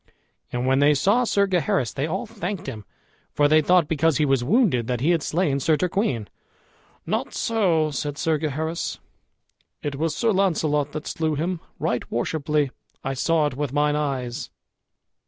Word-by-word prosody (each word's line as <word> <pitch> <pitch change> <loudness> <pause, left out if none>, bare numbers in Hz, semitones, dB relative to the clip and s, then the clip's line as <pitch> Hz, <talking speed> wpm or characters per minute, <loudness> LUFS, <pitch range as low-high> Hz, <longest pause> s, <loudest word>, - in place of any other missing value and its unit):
And 120 +1 -2
when 130 +1 +3
they 145 +1 +5
saw 210 - +3
Sir 200 -3 +2
Gaheris 185 - 0
they 140 +2 -1
all 190 +8 -2
thanked 200 -3 -5
him, 105 -2 -7 0.5
for 145 - +4
they 155 +1 +5
thought, 175 0 +4
because 160 -1 +2
he 150 - +2
was 135 -3 +2
wounded, 155 - +2
that 125 -2 -1
he 160 +6 +3
had 170 -2 +2
slain 150 -3 0
Sir 155 +3 +2
Turquine. 175 - -1 0.8
"Not - - -2
so," 175 -9 +1
said 145 +1 -3
Sir 160 -2 +1
Gaheris; 160 +2 -2 0.9
"it 145 -1 -2
was 155 0 -1
Sir 230 -2 +2
Launcelot 155 -7 +1
that 155 - -5
slew 160 -2 -1
him, 170 +4 -2 0.2
right 125 - -2
worshipfully; 145 +3 0 0.3
I 135 - -2
saw 155 +4 +2
it 145 - -1
with 140 -1 -3
mine 150 0 +2
eyes." 135 -5 -3
150 Hz, 170 wpm, -24 LUFS, 140-175 Hz, 0.9 s, they